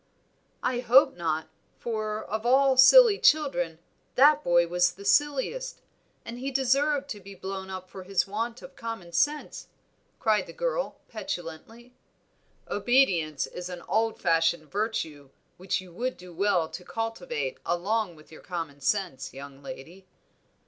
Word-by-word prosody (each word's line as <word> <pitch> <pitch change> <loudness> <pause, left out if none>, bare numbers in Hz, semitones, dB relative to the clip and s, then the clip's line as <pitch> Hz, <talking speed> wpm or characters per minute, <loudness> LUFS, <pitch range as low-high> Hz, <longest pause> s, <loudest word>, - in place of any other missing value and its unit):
"I 250 -1 0
hope 250 +3 +5
not, 160 -2 -2 0.3
for 215 -2 -3
of 220 +1 -4
all 265 +2 +4
silly 410 - +8
children, 270 - +2 0.4
that 295 +3 +6
boy 175 0 +4
was 175 +1 +2
the 200 +2 -12
silliest, 295 - +1 0.5
and 235 +1 -7
he 270 +2 -3
deserved 275 +2 +1
to 210 - -5
be 200 0 -12
blown 190 +1 -6
up 185 -1 -7
for 190 - -10
his 195 +1 0
want 230 +4 -4
of 275 - -12
common 225 -7 -6
sense," 295 - -1 0.5
cried 215 -3 +2
the - - -10
girl, - - -2
petulantly. 225 - -7 0.7
"Obedience 190 - +2
is 180 0 -7
an 175 -1 -7
old 225 0 0
fashioned 165 -2 +1
virtue, 165 -10 -3 0.3
which 185 +1 -2
you 180 -2 -14
would 250 +7 -3
do 180 -1 -12
well 180 -2 +1
to 180 - -8
cultivate 180 - -4
along 190 +2 -1
with 155 0 -18
your 155 - -12
common 165 -6 -6
sense, 165 -5 -1
young 140 0 -10
lady." 175 +7 -10
200 Hz, 145 wpm, -27 LUFS, 175-250 Hz, 0.7 s, silly